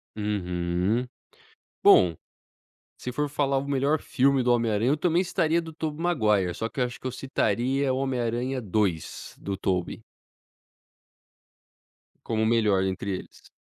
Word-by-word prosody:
Uhum. 95 +2 -1 0.8
Bom, 85 -3 +6 0.8
se 125 - -5
for 150 +3 -1
falar 140 -1 0
o 140 +1 -2
melhor 140 +2 +1
filme 135 0 +2
do 125 0 +2
Homem 115 -2 +2
Aranha, 110 +5 +1
eu 150 - +1
também 175 +3 +2
citaria 170 -2 +1
do 160 -1 -9
Tobey 155 0 -4
Maguire, 105 - +2
só 115 - -3
que - - -7
eu 125 - +3
acho 120 - -7
que - - -17
eu - - -3
citaria 130 +1 0
o - - -1
Homem 135 -2 -1
Aranha 120 +3 -1
2, 95 -5 -2
do 100 -1 -4
Tobey. 90 -2 -2 2.2
Como 110 -1 0
melhor 105 -4 +3
entre 95 +1 -3
eles. - - -11
120 Hz, 150 wpm, -26 LUFS, 100-140 Hz, 2.2 s, Bom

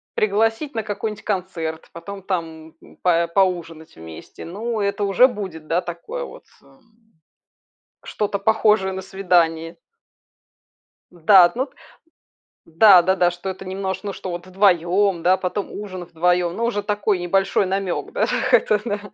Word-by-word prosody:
пригласить 225 +7 0
на 225 - -1
какой-нибудь 210 0 -5
концерт, 175 -5 -4
потом 195 +4 -8
там 160 -4 -5 0.3
па 170 -1 +2
поужинать 170 -3 -1
вместе. 80 0 -11
Ну, 220 +6 -4
это 200 +1 -1
уже 200 +6 +5
будет, 185 -10 -7
да, 175 +2 +1
такое 435 - -6
вот, - - -13 0.2
эм, 225 -4 -27 0.9
что-то 205 -1 -2
похожее 210 -2 +2
на 190 - -5
свидание. 170 -4 0 1.4
Да, 175 +1 +6
ну 255 - 0
вот, 275 - -13 0.9
да-да-да. 180 0 +5
Что 175 +2 -6
это 190 0 -7
немнож 190 +1 -4
ну, 200 -1 -4
что 185 - -6
вот 175 +1 -7
вдвоем, 185 -1 +2
да, 185 +1 +4
потом 195 +2 -4
ужин 190 -3 -7
вдвоем, 175 +1 0
но 230 - -1
уже 205 -4 -1
такой 205 -2 0
небольшой 195 +3 +1
намек 190 -1 -3
да, - - +1
так - - -1
это 210 -1 +4
да. 205 -2 -2
190 Hz, 140 wpm, -21 LUFS, 175-205 Hz, 1.4 s, Да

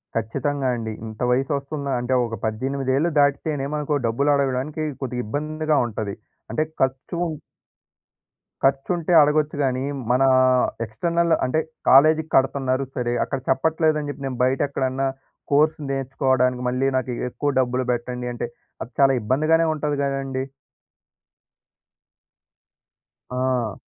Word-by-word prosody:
ఖచ్చితంగా 135 +5 -1
అండి. 115 -2 -4 0.2
ఇంత 110 -1 -10
వయసొస్తుందా 140 +2 -1
అంటే, 125 +2 -1
ఒక 115 -1 -4
18 130 +4 -1
ఏళ్ళు 170 +4 +1
దాటితేనే, 145 0 +1
మనుకు 150 0 -1
డబ్బులు 140 +6 +1
అడగడానికి 140 +3 -1 0.2
కొద్దిగా 125 -2 -3
ఇబ్బందిగా 155 +5 -1
ఉంటది. 105 -3 -4 0.4
అంటే 135 +7 +1 0.2
ఖర్చు 130 +4 -1 1.5
ఖర్చుంటే 155 +6 +1
అడగొచ్చు 150 +1 +2
గానీ, 130 -1 0 0.3
మనా 130 +2 +4 0.6
ఎక్స్‌ట్రనల్ 170 +9 0
అంటే, 130 +5 +1 0.3
కాలేజీకి 155 +3 +5
కడుతున్నారు 135 0 +2
సరే, 120 -2 -1
అక్కడ 135 - -3
చెప్పట్లేదని 155 +2 +1
చెప్పి, 140 0 -7
నేను 130 -2 -5
బయటెక్కడన్నా, 135 0 0 0.4
కోర్స్ 155 +2 +4
నేర్చుకోవడానికి, 130 -2 +1
మళ్ళీ 130 +2 0
నాకు 130 -1 -2 0.2
ఎక్కువ 145 +3 -2
డబ్బులు 125 0 0
బెట్టండి 125 0 -3
అంటే, 120 - -4 0.3
అది 115 - -6
చాలా 135 -1 +6
ఇబ్బందిగానే 155 +9 +2
ఉంటది 150 -1 -2
గదండీ! 135 -1 -2 2.9
ఆ! 125 -4 -1
135 Hz, 115 wpm, -23 LUFS, 125-145 Hz, 2.9 s, చాలా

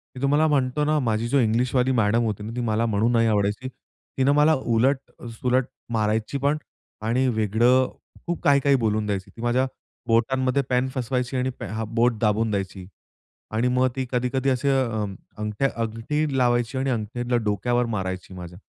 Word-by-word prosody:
मी 125 - -8
तुम्हाला 145 +3 +3
म्हणतो 140 0 +1
ना, 155 0 +2
माझी 115 -2 0
जो 140 +4 +2
इंग्लिशवाली 125 +2 +2
मॅडम 115 -1 +2
होती 105 -2 -2
ना, 110 - -6
ती 125 - -2
मला 115 0 0
म्हणून 110 +2 +1
नाही 115 -1 +3
आवडायची. 105 +4 0 0.5
तिनं 135 +1 +3
मला 150 +2 +5
उलट, 130 +2 +2 0.4
सुलट 125 0 +2 0.3
मारायची 110 +4 0
पण 140 +2 +1 0.4
आणि 120 +4 +1
वेगळं 120 +3 +3 0.4
खूप 175 0 -2
काही, 140 -1 +5
काही 140 0 +3
बोलून 110 -3 0
द्यायची. 100 -2 -3
ती 115 - -10
माझ्या 120 +2 +2 0.4
बोटांमध्ये 130 +3 +2
पेन 125 +1 +2
फसवायची 125 +1 -1
आणि 130 +1 0
पे - - -5
हा 110 +3 -3
बोट 115 0 +1
दाबून 110 +1 +2
द्यायची 95 -2 -3 0.7
आणि 115 +3 +1
मग 125 +1 +2
ती 130 -1 -2
कधी, 125 0 +1
कधी 135 0 +1
असे 130 +2 +1
अ, 115 -6 +1 0.3
अंगठ्या, 105 +5 0
अंगठी 120 +6 -2
लावायची 120 0 +1
आणि 135 +1 0
अंगठीतला 120 +1 -2
डोक्यावर 120 +4 0
मारायची 95 0 -4
माझ्या. 90 0 -9
120 Hz, 175 wpm, -24 LUFS, 110-130 Hz, 0.7 s, मला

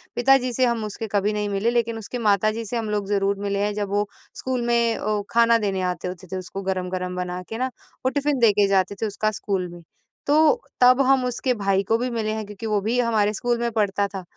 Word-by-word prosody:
पिता 270 +3 +5
जी 255 -1 -3
से 255 +2 +2
हम 235 -2 0
उसके 215 +2 -5
कभी 205 +1 +1
नहीं 210 0 -2
मिले, 200 +3 0
लेकिन 230 -1 0
उसके 225 +3 -6
माता 215 -1 +3
जी 225 +1 -5
से 235 +3 -3
हम 225 -2 -3
लोग 205 -2 -1
ज़रूर 200 0 +1
मिले 200 0 -2
हैं 210 0 0
जब 205 -1 -3
वो 205 +1 0 0.3
स्कूल 260 -1 -2
में 235 -1 +2
अ, 210 0 -1
ख़ाना 230 0 +5
देने 200 -4 -1
आते 180 - -5
होते 185 +1 -7
थे 190 - -2
उसको 185 +1 -6
गरम-गरम 185 -1 -3
बना 180 0 -3
के 225 - -4
ना, 255 +2 0 0.4
वो - - +4
टिफ़िन 285 0 0
दे 230 -3 +6
के 205 0 +3
जाते 195 0 +1
थे - - +1
उसका 215 +1 -1
स्कूल 190 -3 -1
में। 175 - -11 0.5
तो 290 - +4 0.5
तब 250 +2 +6
हम 265 -1 +4
उसके 250 +1 0
भाई 195 -3 +1
को 225 - +3
भी 250 +2 -2
मिले 225 -3 -2
हैं 220 -1 -4
क्योंकि 210 +2 -9
वो 210 -2 +1
भी 230 +5 0
हमारे 220 -3 +2
स्कूल 240 +2 0
में 235 0 -1
पढ़ता 205 -2 +1
था, 195 -2 -7
215 Hz, 245 wpm, -23 LUFS, 200-235 Hz, 0.5 s, दे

